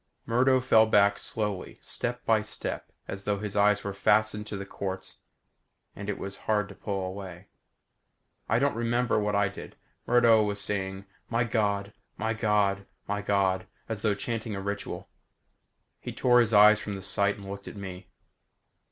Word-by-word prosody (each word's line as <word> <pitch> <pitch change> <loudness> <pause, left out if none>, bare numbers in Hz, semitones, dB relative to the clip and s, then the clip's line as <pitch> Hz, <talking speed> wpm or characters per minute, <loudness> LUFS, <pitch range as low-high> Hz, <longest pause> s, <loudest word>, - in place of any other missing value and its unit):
Murdo 130 +3 +3
fell 110 -3 +5
back 100 -1 +4
slowly, 105 -4 -3
step - - -4
by - - +4
step - - -5 0.2
as 100 0 -5
though 105 -1 +1
his 105 0 -5
eyes 105 0 +3
were 100 - -3
fastened 105 +1 +2
to 105 - -4
the 100 - -5
quartz 95 -1 -6 0.8
and 100 0 -6
it 105 - -2
was 100 0 -6
hard 105 -2 +2
to 100 - -10
pull 95 -1 -3
away. 95 -1 -8 1.0
I 115 - +3
don't 140 +3 +2
remember 120 0 +1
what 105 -1 0
I 100 0 +3
did. 100 - -9 0.3
Murdo 115 -2 +6
was 105 -1 -1
saying 95 -1 -3 0.2
"My 115 +1 +2
God 105 -3 0 0.2
my 110 +1 -1
God 105 -3 +1 0.2
my 100 0 -1
God," 95 -2 +1 0.2
as 110 -3 -4
though 105 -2 +2
chanting 115 0 -4
a - - -3
ritual. 100 +1 -4 0.9
He - - -6
tore 125 -1 +4
his 115 -2 +3
eyes 105 0 +7
from 105 -2 -5
the 95 - -7
sight 100 +1 +1
and 100 -1 -10
looked 100 0 -7
at - - -8
me. 95 -2 -8
105 Hz, 170 wpm, -28 LUFS, 100-110 Hz, 1.0 s, eyes